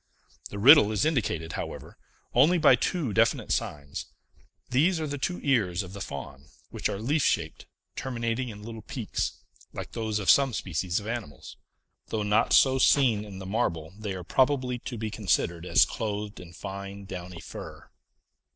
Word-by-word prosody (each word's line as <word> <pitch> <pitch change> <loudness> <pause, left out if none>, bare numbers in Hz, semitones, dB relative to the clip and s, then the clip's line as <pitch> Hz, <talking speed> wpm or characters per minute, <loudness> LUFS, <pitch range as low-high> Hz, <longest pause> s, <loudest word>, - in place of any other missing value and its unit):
The 100 - -7
riddle 125 0 +8
is 105 +3 +1
indicated, 100 - -1
however, - - -6 0.4
only 175 +4 +5
by 155 -5 +6
two 140 - -1
definite 115 +1 +2
signs: 70 -1 -3 0.6
these 160 +7 +3
are 155 - -2
the 145 -1 -4
two 175 +6 -2
ears 100 -10 +1
of 90 0 -10
the 100 - -7
Faun, 70 -5 -7 0.2
which - - -2
are - - -3
leaf 140 +9 0
shaped, 80 -10 -1 0.3
terminating 120 -1 -2
in 105 -1 -9
little 115 0 -8
peaks, - - -3 0.4
like - - -7
those 110 -2 -2
of 100 -3 -4
some 135 -3 +4
species 90 -2 -2
of 105 - -10
animals. 110 - -6 0.5
Though 110 -1 -2
not 105 +2 +2
so 130 -1 +5
seen 125 -7 +4
in 100 -3 -9
the 95 - -8
marble, 85 -6 -2
they 105 -2 -5
are 90 - -6
probably 130 +2 +1
to 120 0 -6
be 110 -1 -4
considered 90 -4 0
as - - +5
clothed 105 -1 -4
in 90 -1 -11
fine, 100 +2 -7
downy 90 -2 -7
fur. 85 - -10
105 Hz, 170 wpm, -27 LUFS, 95-130 Hz, 0.6 s, riddle